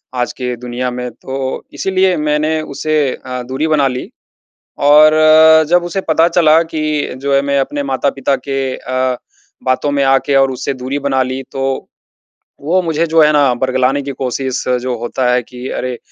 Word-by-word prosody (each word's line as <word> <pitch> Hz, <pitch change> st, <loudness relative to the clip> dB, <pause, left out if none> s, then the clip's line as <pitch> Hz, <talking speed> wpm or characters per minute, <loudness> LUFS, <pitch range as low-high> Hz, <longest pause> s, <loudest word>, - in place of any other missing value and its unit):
आज 125 Hz, -1 st, -1 dB
के 125 Hz, -1 st, -4 dB
दुनिया 125 Hz, +1 st, -4 dB
में, 125 Hz, 0 st, -5 dB
तो 130 Hz, +3 st, -5 dB
इसीलिए 190 Hz, -1 st, +1 dB
मैंने 150 Hz, +1 st, 0 dB
उसे 155 Hz, +1 st, -2 dB, 0.3 s
अ, 125 Hz, -1 st, -4 dB
दूरी 130 Hz, +5 st, -2 dB
बना 150 Hz, -3 st, +2 dB
ली। 125 Hz, -1 st, -5 dB, 0.8 s
और 150 Hz, +1 st, +7 dB, 0.6 s
जब 175 Hz, 0 st, +3 dB
उसे 185 Hz, +3 st, -3 dB
पता 160 Hz, +1 st, +4 dB
चला 165 Hz, -2 st, +4 dB
कि 155 Hz, -2 st, -2 dB
जो 140 Hz, +1 st, -2 dB
है 140 Hz, -, +3 dB
मैं 140 Hz, 0 st, 0 dB
अपने 145 Hz, +1 st, -2 dB
माता-पिता 135 Hz, 0 st, -1 dB
के 135 Hz, -1 st, -2 dB
अ, 130 Hz, 0 st, -2 dB, 0.5 s
बातों 130 Hz, +3 st, 0 dB
में 140 Hz, -1 st, +1 dB
आके 135 Hz, +1 st, +2 dB
और 135 Hz, 0 st, +3 dB
उससे 130 Hz, +2 st, -3 dB
दूरी 130 Hz, +2 st, -4 dB
बना 135 Hz, -2 st, 0 dB
ली 130 Hz, +1 st, -4 dB
तो, 135 Hz, 0 st, -3 dB, 0.7 s
वो 175 Hz, +6 st, +1 dB
मुझे 165 Hz, -1 st, 0 dB
जो 165 Hz, 0 st, +3 dB
है 150 Hz, -, +4 dB
ना 140 Hz, -4 st, +3 dB
बरगलाने 130 Hz, +2 st, 0 dB
की 140 Hz, -, -5 dB
कोशिश 130 Hz, 0 st, -3 dB, 0.2 s
जो 125 Hz, -1 st, -2 dB
होता 125 Hz, +1 st, -1 dB
है 125 Hz, -, +2 dB
कि 125 Hz, +2 st, -9 dB
अरे 125 Hz, -1 st, -3 dB
135 Hz, 175 wpm, -15 LUFS, 130-150 Hz, 0.8 s, और